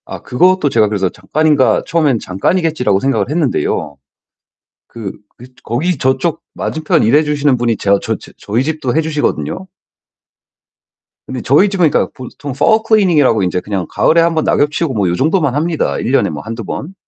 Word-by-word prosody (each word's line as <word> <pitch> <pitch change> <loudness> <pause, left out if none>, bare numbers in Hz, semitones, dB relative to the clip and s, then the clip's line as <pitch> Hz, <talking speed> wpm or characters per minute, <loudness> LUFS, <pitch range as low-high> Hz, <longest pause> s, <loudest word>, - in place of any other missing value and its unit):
아 - - -8
그것도 180 +2 +2
제가 110 -4 +3
그래서 100 -3 -1
'잠깐인가?' 145 - +1
처음엔 150 -8 +1
'잠깐이겠지.'라고 125 - 0
생각을 135 +1 0
했는데요. 140 - -1 0.9
그 110 -5 -7 0.3
그 125 - -12 0.2
거기 155 +8 -1
저쪽 130 +6 0
맞은편 160 0 0
일해 135 +8 +4
주시는 145 -3 +1
분이 115 -2 0
제 100 - -2
아 100 - +5
저 - - -2
저 - - -15
저희 115 +5 -1
집도 155 -4 -2
해 160 - +3
주시거든요. 160 +4 -2 1.6
근데 130 -2 -5
저희 150 - +3
집은 180 -5 +2
그러니까 - - 0
보통 135 +2 -8
fall 150 - +3
cleaning이라고 170 - +3
인제 90 0 0
그냥 100 -4 -3
가을에 165 +1 +3
1 170 0 +2
번 160 -1 0
낙엽 145 0 +2
치우고 155 -2 -2
뭐 100 -5 0
요 85 - 0
정도만 145 - +1
합니다, 160 +2 -1
1 - - -2
년에 - - +3
뭐 75 - -6
1-2 115 +1 -6
번. 155 - -6
140 Hz, 395 characters per minute, -15 LUFS, 115-160 Hz, 1.6 s, 아